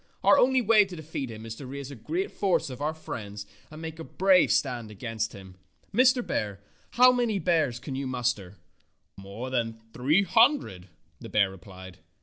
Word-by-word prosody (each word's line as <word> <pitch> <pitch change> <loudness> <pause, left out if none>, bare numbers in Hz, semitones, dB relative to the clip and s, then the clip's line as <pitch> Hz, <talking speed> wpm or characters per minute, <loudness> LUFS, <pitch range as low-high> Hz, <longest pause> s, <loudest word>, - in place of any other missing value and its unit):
Our - - +6
only 260 0 +4
way 215 -1 +6
to 190 -2 -9
defeat 155 -5 -5
him 110 0 -9
is 115 - -6
to 135 - -9
raise 140 +1 -7
a - - -8
great 360 - -3
force 180 -7 0
of 125 - -9
our 155 +2 -1
friends 105 -9 -7 0.2
and 155 - -11
make 160 0 -7
a - - -5
brave 185 +2 +3
stand 120 -5 0
against 110 +1 -4
him. 95 -2 -12 0.4
Mr. 255 0 +4
Bear, 100 -2 -3 0.3
how 250 +1 +7
many 240 -4 0
bears 160 -10 +1
can 135 +2 -7
you 135 0 -3
muster?" 120 -7 -2 0.6
"More 100 +6 -8
than 115 -3 -2
three 150 +10 +2
hundred," 190 - +2 0.3
the - - -9
bear 100 -2 +2
replied. 95 -1 -12
130 Hz, 180 wpm, -27 LUFS, -, 0.6 s, how